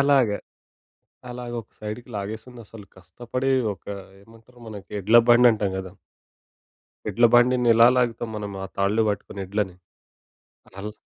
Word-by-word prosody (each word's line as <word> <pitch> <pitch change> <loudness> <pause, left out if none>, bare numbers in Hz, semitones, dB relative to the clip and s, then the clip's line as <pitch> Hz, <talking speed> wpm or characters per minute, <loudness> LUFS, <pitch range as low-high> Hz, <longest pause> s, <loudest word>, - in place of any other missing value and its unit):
అలాగ. 140 -4 +4 1.0
అలాగ 125 0 -7
ఒక 110 - -25
సైడ్‌కి 110 +4 -7
లాగేసిందసలు 110 +1 -8
కష్టపడి, 120 +9 -4 0.2
ఒక 95 - -21 0.4
ఏమంటారు? 115 +3 -20
మనకి 105 -5 -10
ఎడ్ల 110 +5 +6
బండంటాం 120 -5 +5
గదా! 95 -1 -7 1.2
ఎడ్ల 120 - +2
బండిని 125 0 +4
ఇలా 115 +1 +7
లాగుతాం 120 -2 0
మనం, 105 -1 -5
ఆ - - -5
తాళ్లు 100 +3 +2
బట్టుకుని 100 -1 -5
ఎడ్లని? 95 -2 -2 1.0
అల్ 105 +2 -5
110 Hz, 120 wpm, -24 LUFS, 100-120 Hz, 1.2 s, ఇలా